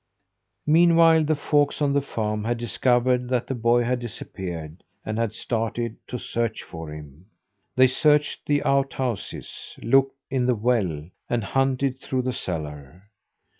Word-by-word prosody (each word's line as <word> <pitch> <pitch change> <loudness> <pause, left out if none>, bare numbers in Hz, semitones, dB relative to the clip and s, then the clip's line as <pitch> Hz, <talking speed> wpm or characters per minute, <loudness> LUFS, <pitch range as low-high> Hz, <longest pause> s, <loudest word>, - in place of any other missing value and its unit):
Meanwhile 165 0 +5
the 155 +1 +2
folks 145 0 +1
on 145 -2 +2
the 140 - +3
farm 105 -5 -3
had 120 +1 0
discovered 125 +1 +1
that 125 -2 0
the - - -3
boy 120 0 +2
had 125 +1 0
disappeared, 90 -8 -7 0.2
and 110 +1 -2
had 115 -2 0
started 115 0 -2
to 125 - -4
search 115 -1 -2
for 80 -2 -8
him. 75 +3 -11 0.5
They 130 - +7
searched 150 +3 +2
the 145 -1 +2
outhouses, 135 -5 -2
looked 135 +3 +3
in 130 -2 +1
the 125 - +3
well, 105 -10 0 0.2
and 120 -2 0
hunted 135 +3 0
through 130 -1 -2
the 130 0 -1
cellar. 75 - -6
120 Hz, 145 wpm, -24 LUFS, 105-135 Hz, 0.5 s, They